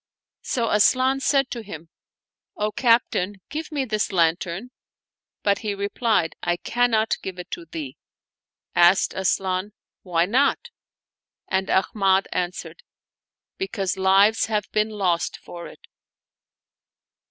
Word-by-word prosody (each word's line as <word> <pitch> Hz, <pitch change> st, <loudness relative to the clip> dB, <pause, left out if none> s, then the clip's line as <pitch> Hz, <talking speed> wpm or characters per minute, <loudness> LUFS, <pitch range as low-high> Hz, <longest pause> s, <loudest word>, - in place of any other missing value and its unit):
So 235 Hz, -3 st, -1 dB
Asian 255 Hz, +5 st, +3 dB
said 270 Hz, -1 st, +1 dB
to 235 Hz, -, -4 dB
him, 165 Hz, -6 st, -10 dB, 0.3 s
" -, -, -69 dB, 0.3 s
O 210 Hz, 0 st, -1 dB
captain, 230 Hz, -4 st, +2 dB
give 310 Hz, +3 st, -5 dB
me 285 Hz, -3 st, -1 dB
this 215 Hz, -4 st, -1 dB
lan 165 Hz, -3 st, +3 dB
tern," 185 Hz, +8 st, -7 dB, 0.7 s
but 200 Hz, -1 st, +2 dB
he 210 Hz, -2 st, -3 dB
replied, 200 Hz, -3 st, 0 dB
" -, -, -51 dB
I 175 Hz, 0 st, 0 dB
cannot 225 Hz, +1 st, +1 dB
give 185 Hz, -1 st, -6 dB
it 180 Hz, -, -9 dB
to 170 Hz, -, -6 dB
thee." 155 Hz, -5 st, -7 dB, 0.8 s
Asked 175 Hz, +2 st, +4 dB
Asian, 190 Hz, +1 st, -1 dB, 0.2 s
" -, -, -70 dB
Why 170 Hz, -2 st, +1 dB
not? 280 Hz, -, +1 dB, 0.4 s
" -, -, -69 dB
and 190 Hz, 0 st, 0 dB
Ahmad 195 Hz, 0 st, +2 dB
answered, 180 Hz, -, -4 dB, 0.4 s
" -, -, -69 dB
Because 200 Hz, -, -2 dB
lives 195 Hz, +3 st, +4 dB
have 210 Hz, -2 st, -1 dB
been 215 Hz, 0 st, +1 dB
lost 185 Hz, -5 st, -1 dB
for 170 Hz, 0 st, -10 dB
it." -, -, -14 dB
200 Hz, 140 wpm, -23 LUFS, 180-230 Hz, 0.8 s, Asked